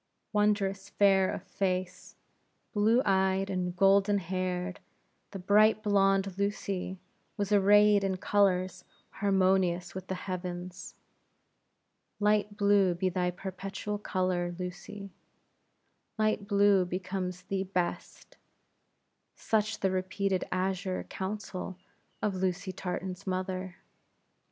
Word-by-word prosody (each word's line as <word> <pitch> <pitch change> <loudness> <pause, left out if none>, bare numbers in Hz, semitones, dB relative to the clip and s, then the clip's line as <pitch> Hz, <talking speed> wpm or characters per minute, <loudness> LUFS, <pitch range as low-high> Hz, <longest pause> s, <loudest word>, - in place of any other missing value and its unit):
Wondrous 205 -2 +1
fair 195 -2 +4
of - - -5
face, 185 -1 -3 0.6
blue 220 +5 +3
eyed, 190 0 +2
and 180 -1 -2
golden 195 +2 +4
haired, 185 0 -3 0.5
the 195 - -7
bright 215 +3 +4
blonde, 195 -2 +2
Lucy, 200 -2 -2 0.4
was 205 -1 -2
arrayed 205 0 +5
in 190 -1 0
colors 185 -2 +1 0.3
harmonious 190 -3 +1
with 185 0 -7
the 190 - -2
heavens. 180 -1 -6 1.2
Light 210 0 +1
blue 200 -3 +4
be 185 +2 0
thy 180 0 0
perpetual 195 +3 -5
color, 185 -3 -1
Lucy; 195 +2 -7 1.1
light 215 -2 0
blue 200 -2 +4
becomes 180 0 -4
thee 195 -1 -2
best 180 -2 -4 1.0
such 215 -1 -1
the 190 - +2
repeated 185 0 -1
azure 185 0 -1
counsel 190 -1 -5 0.5
of 210 - +1
Lucy 185 +1 -2
Tartan's 185 +1 -5
mother. 185 -1 -3
190 Hz, 105 wpm, -30 LUFS, 185-200 Hz, 1.2 s, arrayed